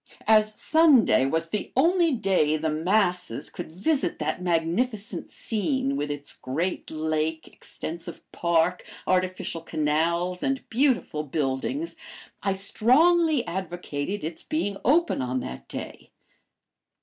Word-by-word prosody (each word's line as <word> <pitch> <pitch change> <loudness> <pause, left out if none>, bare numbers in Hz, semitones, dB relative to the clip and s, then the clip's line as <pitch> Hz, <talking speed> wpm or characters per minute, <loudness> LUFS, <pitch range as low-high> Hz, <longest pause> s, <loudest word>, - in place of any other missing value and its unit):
As 215 -1 +4
Sunday 270 - +5
was 160 +3 -1
the 210 - -3
only 335 +3 +4
day 190 - +2
the 160 0 -1
masses 180 - 0
could - - -7
visit 265 - 0
that - - -2
magnificent 180 +6 -1
scene, 265 +5 -1
with 145 - -2
its 145 0 -5
great 165 +8 -3
lake, 155 0 -2
extensive 170 +1 -7
park, 170 +1 +1 0.2
artificial 185 -2 0
canals, 165 +3 0
and 270 -1 -1
beautiful 245 - +1
buildings, 150 - -2 0.5
I 195 - +1
strongly 295 - +3
advocated 175 0 -4
its 160 +1 -4
being 240 -10 -2
open 320 - +3
on 130 0 -1
that 65 0 -7
day. - - -8
180 Hz, 115 wpm, -26 LUFS, 160-245 Hz, 0.5 s, Sunday